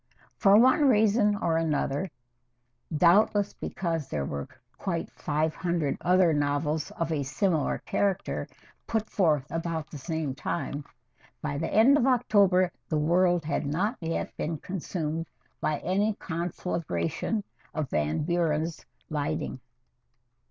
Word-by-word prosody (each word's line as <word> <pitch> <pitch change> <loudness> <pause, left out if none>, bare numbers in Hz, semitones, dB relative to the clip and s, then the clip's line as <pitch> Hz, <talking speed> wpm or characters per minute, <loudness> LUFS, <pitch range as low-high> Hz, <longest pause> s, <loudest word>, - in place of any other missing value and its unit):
For 200 -1 +6
one 260 +5 +5
reason 210 -2 +4
or 165 -5 0
another, 155 +1 0 0.9
doubtless 200 +4 +4
because 165 -5 -3
there 70 -2 -2
were 70 0 -4 0.3
quite - - -3
five 155 +1 -1
hundred 170 -5 -1
other 180 -2 +4
novels 145 +1 0
of 165 -1 -1
a 155 -3 0
similar 155 +3 0
character 195 -2 -1 0.4
put 220 -1 -1
forth 155 -8 +2
about 165 -2 -3
the 150 - -7
same 160 -1 -2
time, 145 +1 -3 0.5
by 145 -1 -3
the 165 - -2
end 265 +7 +6
of 260 - +2
October 200 -8 +4 0.2
the 155 - +1
world 175 +2 +3
had 145 -1 -1
not 190 - 0
yet 165 0 -3
been 160 +1 -2
consumed 165 -2 -4 0.3
by 150 - 0
any 200 +4 +1
conflagration 170 - -2 0.3
of 150 -4 -2
Van 75 - 0
Buren's 165 -1 0 0.3
lighting. 145 -3 -2
165 Hz, 125 wpm, -28 LUFS, 150-195 Hz, 0.9 s, For